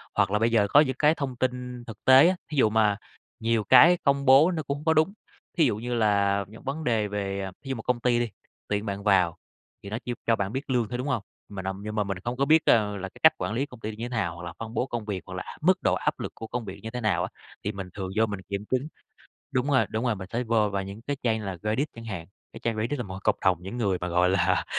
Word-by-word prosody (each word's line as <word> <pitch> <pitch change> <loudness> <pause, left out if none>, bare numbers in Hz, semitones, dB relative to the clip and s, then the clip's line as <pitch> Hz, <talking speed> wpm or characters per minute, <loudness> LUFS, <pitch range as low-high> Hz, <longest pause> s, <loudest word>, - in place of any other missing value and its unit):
Hoặc 100 -2 +2
là 105 - +2
bây 115 +1 +2
giờ 105 -3 +3
có 145 - +7
những 135 -4 +3
cái 150 +1 +4
thông 135 -4 -3
tin 125 -1 -3
thực 110 -1 -11
tế 130 +4 +8
á, 185 - +2 0.2
thí 150 - -3
dụ 110 - +5
mà 105 -2 +3 0.4
nhiều 115 -1 +1
cái 145 - +7
công 140 -1 +2
bố 140 +6 +7
nó 160 -3 -2
cũng 140 +1 -4
có 160 - +4
đúng, 160 +5 +2 0.4
thí 165 - +5
dụ 120 - +1
như 120 +3 -4
là 100 -3 +2
những 110 +2 -14
vấn 145 +4 -4
đề 115 -5 +1
về 100 -1 -3
thí 135 - -9
dụ 135 - -1
một 110 - -7
công 125 -1 0
ty 120 -1 +2
đi, 120 -1 -1 0.4
tuyển 105 +1 -1
bạn 100 0 -4
vào 95 -5 +3 0.5
thì 100 - -7
nó 110 - -3
chỉ 125 - -2
cho 115 - +4
bạn 100 -2 -2
biết 135 +2 -4
lương 120 -4 +1
thôi, 125 - -3
đúng 125 - -3
hông? 115 -7 -1 0.3
Mình 95 -2 -6
âm 95 +1 -4
nhưng 105 0 -5
mà 105 - +2
mình 100 -1 -3
không 120 +6 -4
có 140 - +2
biết, 160 +3 +4
à, 110 -2 +5
là 100 -2 -5
cái - - -18
cách - - +8
quản - - -3
lý 130 +5 0
công 125 -4 -14
ty 110 - -4
như 115 +2 -5
thế 120 - -5
nào 100 -9 -1
hoặc 85 - -9
là 85 - -6
phân 115 0 -6
bố 125 - 0
công 120 -4 -5
việc, 100 -3 -3
hoặc 95 - -9
là 95 - -7
mức 185 +3 +4
độ - - +3
áp - - -1
lực - - -4
của 115 - -7
công 120 -1 -4
việc 95 - -8
như 110 - -4
thế 125 +2 -5
nào 110 -2 +1
á, - - -3 0.3
thì - - -1
mình 95 -2 -7
thường 95 -2 -5
vô 110 - +5
mình 105 -3 -5
kiểm 100 +1 -3
chứng. 130 +3 +1 0.6
Đúng 130 0 0
rồi, 130 - +4
đúng 110 +3 -2
rồi, 120 -3 +1
mình 95 -1 -8
phải 120 +2 -1
vô 110 -3 +2
vào 100 -1 -2
những 100 +3 -8
cái 140 +4 -3
trang 110 -2 +1
như 105 - -6
là 95 -2 -4
Reddit 110 +8 0
chẳng 115 0 -9
hạn, 95 -7 -5 0.3
cái 115 - -9
trang 115 -2 -1
Reddit 120 +6 -1
là - - -1
một 95 - -8
cái 95 - -7
cộng 105 - +3
đồng 95 -2 +4
những 95 +6 -6
người 100 -6 +1
mà, 90 - -2
gọi 90 +1 +3
là, 95 -1 +2
110 Hz, 300 wpm, -26 LUFS, 100-125 Hz, 0.6 s, tế